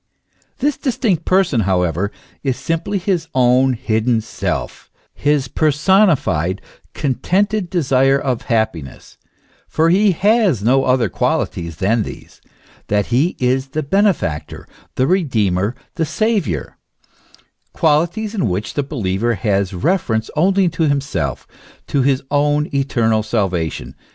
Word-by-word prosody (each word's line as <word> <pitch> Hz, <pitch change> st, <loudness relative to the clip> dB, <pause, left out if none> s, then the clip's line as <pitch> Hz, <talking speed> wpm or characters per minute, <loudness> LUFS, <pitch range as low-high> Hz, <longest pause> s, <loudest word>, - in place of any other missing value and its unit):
This 290 Hz, +2 st, 0 dB
distinct 220 Hz, -, -1 dB
person, 185 Hz, -9 st, +2 dB
however, 90 Hz, -1 st, 0 dB, 0.3 s
is 130 Hz, -3 st, -1 dB
simply 165 Hz, +5 st, -2 dB
his 180 Hz, -3 st, -1 dB
own 130 Hz, +1 st, +4 dB
hidden 115 Hz, -1 st, 0 dB
self, 110 Hz, -, -4 dB, 0.2 s
his 145 Hz, -2 st, 0 dB
personified, 150 Hz, -, +2 dB, 0.4 s
contented 185 Hz, -, 0 dB
desire 135 Hz, -5 st, +2 dB
of 130 Hz, -4 st, -2 dB
happiness: 110 Hz, -, -3 dB, 0.5 s
for 165 Hz, +1 st, +2 dB
he 200 Hz, +1 st, +4 dB
has 200 Hz, -, +2 dB
no 135 Hz, +4 st, +3 dB
other 125 Hz, -3 st, +2 dB
qualities 85 Hz, -2 st, -2 dB
than 105 Hz, +8 st, +1 dB
these, -, -, -9 dB, 0.5 s
that 105 Hz, -1 st, +1 dB
he 145 Hz, +9 st, +2 dB
is 130 Hz, +1 st, 0 dB
the 150 Hz, +3 st, -3 dB
benefactor, 185 Hz, -, -1 dB, 0.3 s
the 130 Hz, -, +2 dB
Redeemer, 115 Hz, -, +1 dB, 0.2 s
the 165 Hz, -, -1 dB
Saviour, 160 Hz, -, -1 dB, 0.9 s
qualities 170 Hz, +8 st, +1 dB
in 185 Hz, -, 0 dB
which 95 Hz, +4 st, -3 dB
the 145 Hz, -, 0 dB
believer 115 Hz, -5 st, -1 dB
has 100 Hz, -1 st, 0 dB
reference 110 Hz, -, -1 dB
only 190 Hz, +4 st, +3 dB
to 165 Hz, -1 st, 0 dB
himself, 95 Hz, -, -2 dB, 0.4 s
to 140 Hz, -, 0 dB
his 135 Hz, 0 st, +1 dB
own 145 Hz, +1 st, +2 dB
eternal 115 Hz, -5 st, +1 dB
salvation. 95 Hz, -8 st, -2 dB
135 Hz, 120 wpm, -18 LUFS, 110-170 Hz, 0.9 s, own